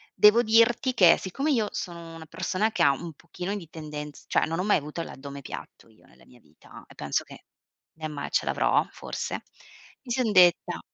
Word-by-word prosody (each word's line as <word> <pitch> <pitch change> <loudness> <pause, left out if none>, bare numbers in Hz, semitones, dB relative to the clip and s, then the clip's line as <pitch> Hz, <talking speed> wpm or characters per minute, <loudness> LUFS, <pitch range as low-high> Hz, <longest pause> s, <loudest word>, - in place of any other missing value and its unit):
Devo 215 +3 +6
dirti 230 +3 +3
che 185 -8 +6
siccome 270 - -3
io 225 -6 +2
sono 170 -2 -6
una 165 -1 -10
persona 185 +6 -1
che 230 - +1
ha 140 - +6
un 165 +5 -5
pochino 180 +5 -6
di 175 -5 -9
tendenza 150 -2 -8
cioè - - +2
non 165 +2 -3
ho - - 0
mai 205 - +3
avuto 150 +3 -5
l'addome 140 -3 -8
piatto 120 - -10
io 110 - -24
nella - - -22
mia 125 - -19
vita 80 -7 -16
e - - -16
penso - - -2
che - - -14 0.5
né 155 0 -6
mai 150 -2 -6
ce - - +1
l'avrò - - +2
forse, - - -5 0.6
mi 250 - -8
sono 240 -2 +1
detta. 180 -2 +4
175 Hz, 200 wpm, -26 LUFS, 150-210 Hz, 0.6 s, Devo